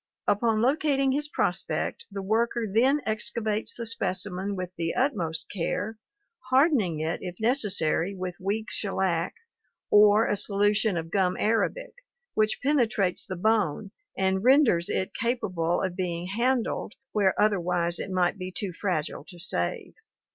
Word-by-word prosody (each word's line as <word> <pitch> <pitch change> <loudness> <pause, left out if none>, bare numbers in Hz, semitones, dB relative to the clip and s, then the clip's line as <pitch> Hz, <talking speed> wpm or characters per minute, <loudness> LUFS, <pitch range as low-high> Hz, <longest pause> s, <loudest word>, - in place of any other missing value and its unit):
Upon 220 +1 +2
locating 275 0 +2
his 295 +2 -1
prospect - - -2
the 200 -1 -5
worker 230 +3 +1
then 255 +8 +3
excavates 215 0 -1
the 235 - -5
specimen 195 -2 -2
with 180 -1 -4
the 165 0 -2
utmost 185 - 0
care, 210 +4 -2 0.5
hardening 255 - +3
it 160 +2 -2
if 180 -1 -6
necessary 200 - +1
with 185 -1 -4
weak 210 +4 -2
shellac 185 -4 -1 0.6
or 210 +1 +6
a - - +1
solution 205 0 +1
of 165 0 -5
gum 185 -2 +1
arabic, 365 - 0 0.4
which 215 0 +1
penetrates 225 -10 +1
the 185 - -4
bone 205 -2 +1 0.3
and 190 0 +1
renders 250 - +4
it 190 - -1
capable 185 -8 -1
of 185 -2 -2
being 180 -1 -3
handled 240 -2 0 0.2
where 195 -3 +2
otherwise 175 -4 +1
it - - -4
might 185 +1 +1
be 185 0 -5
too 190 -1 -4
fragile 165 -6 -2
to 180 - -12
save. 175 +5 -2
205 Hz, 140 wpm, -27 LUFS, 180-230 Hz, 0.6 s, or